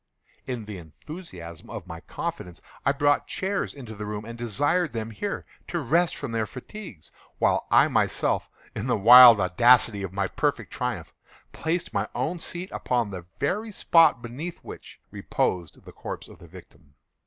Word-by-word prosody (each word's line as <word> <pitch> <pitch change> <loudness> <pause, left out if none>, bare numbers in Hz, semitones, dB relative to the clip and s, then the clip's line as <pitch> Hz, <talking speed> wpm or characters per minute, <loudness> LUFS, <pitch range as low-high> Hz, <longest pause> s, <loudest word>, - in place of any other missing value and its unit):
In 125 -4 -4
the 105 -3 -7
enthusiasm 85 - -11
of - - -7
my 80 0 -8
confidence, 85 +1 -6 0.2
I 140 - +3
brought 145 +1 +2
chairs 195 +1 -2
into 120 -6 -9
the 105 0 -6
room, 105 0 -5
and 115 +1 -8
desired 145 - 0
them 115 -1 -4
here 200 - -4 0.2
to 175 - -3
rest 165 +5 +1
from 140 -4 -5
their 110 -1 -1
fatigues, 130 - -10 0.3
while - - +1
I - - +6
myself, - - 0 0.3
in 105 - -3
the 125 - +2
wild 120 +2 +10
audacity 105 +3 +4
of 95 -2 -4
my 95 0 -1
perfect - - -2
triumph, - - -4 0.4
placed 170 +2 -2
my - - -1
own 175 +2 -2
seat 175 +3 -5
upon 120 -4 -1
the 90 -2 -8
very 210 +10 -1
spot 165 - +4
beneath 145 +9 -6
which - - -11
reposed 85 -4 -2
the - - -11
corpse - - -7
of - - -15
the 85 - -14
victim. 80 -4 -16
120 Hz, 165 wpm, -26 LUFS, 100-160 Hz, 0.4 s, wild